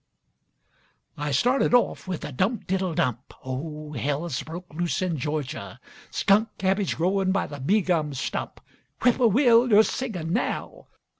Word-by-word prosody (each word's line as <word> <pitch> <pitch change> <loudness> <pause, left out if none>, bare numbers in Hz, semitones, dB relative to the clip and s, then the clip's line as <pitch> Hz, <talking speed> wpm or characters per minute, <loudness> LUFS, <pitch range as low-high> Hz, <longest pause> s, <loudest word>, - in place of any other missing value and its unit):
I 150 0 -3
started 245 - +3
off 245 - +1
with 185 -3 -4
a - - -6
dump 190 - -1
diddle 185 -3 -1
dump, 125 -2 -2
(Oh, 150 +3 -5
hell's 145 +2 -2
broke 170 +1 -9
loose 175 +2 -1
in 180 -3 -1
Georgia!) 135 -9 -4 0.3
Skunk 210 +3 +3
cabbage 195 0 0
growin' 190 +3 +1
by 195 - +1
the 145 -1 -8
bee 195 +11 +2
gum 155 -6 0
stump. - - -4 0.4
(Whippoorwill, 240 0 +5
yo're 215 0 +7
singin' 180 -11 -3
now!) 235 - -3
175 Hz, 140 wpm, -25 LUFS, 150-210 Hz, 0.4 s, yo're